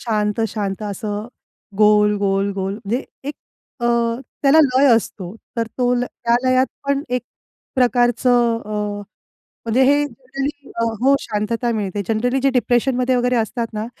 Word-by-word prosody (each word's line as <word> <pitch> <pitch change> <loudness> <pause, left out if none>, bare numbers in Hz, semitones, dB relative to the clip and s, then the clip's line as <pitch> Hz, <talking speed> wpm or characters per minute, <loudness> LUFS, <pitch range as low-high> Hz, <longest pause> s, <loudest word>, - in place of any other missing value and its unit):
शांत-शांत 210 -2 -1
असं 210 +1 -4 0.5
गोल-गोल-गोल 200 -2 +2
म्हणजे 230 +4 -3 0.2
एक 290 - -4 0.5
अ, 240 - 0 0.6
त्याला 280 +3 +5
लय 265 0 +3
असतो. 200 -4 -3 0.2
तर 230 -1 0
तो 245 0 +2
ल 245 0 0
त्या 235 -1 -1
लयात 255 0 +3 0.2
पण 280 0 +1
एक 250 -1 -1 0.5
प्रकारचं 245 -1 +3
अ, 215 - -9 1.0
म्हणजे 235 +4 +3
हे 285 +2 +4
जनरली 275 +2 -6 0.3
हो, 275 +1 +5
शांतता 230 +2 -2
मिळते. 205 -2 -2
जनरली 245 +4 +1
जे 275 - +3
डिप्रेशन 250 0 +1
मध्ये 255 0 +1
वगैरे 250 0 +1
असतात 230 +1 -1
ना, 215 +1 -3
235 Hz, 135 wpm, -20 LUFS, 210-255 Hz, 1.0 s, त्याला